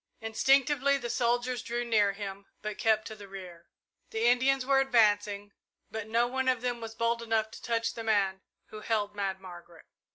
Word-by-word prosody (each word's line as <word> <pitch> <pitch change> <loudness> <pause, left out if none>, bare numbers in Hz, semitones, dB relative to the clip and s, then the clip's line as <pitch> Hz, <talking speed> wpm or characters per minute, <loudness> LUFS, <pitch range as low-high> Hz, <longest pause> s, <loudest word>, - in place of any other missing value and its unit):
Instinctively 270 +5 +3
the 240 -3 -4
soldiers 245 0 0
drew 240 +1 -3
near 210 -4 +3
him, 195 -1 -7 0.2
but 215 -1 -5
kept 220 -1 +2
to 220 - -7
the 205 -1 -11
rear. 180 -3 -10 0.4
The 225 +1 -1
Indians 260 +2 +3
were 270 0 +4
advancing, 205 -5 +2 0.4
but 220 -1 -5
no 230 +2 +2
one 260 +2 -2
of 255 -2 +1
them 245 -1 -2
was 225 -1 -7
bold 230 +1 0
enough 225 -1 0
to - - -11
touch 230 -1 -1
the 230 - -6
man 200 -3 +1 0.3
who 215 - -8
held 210 -2 -1
Mad 195 -2 -2
Margaret. 175 -3 -12
225 Hz, 185 wpm, -30 LUFS, 205-240 Hz, 0.4 s, were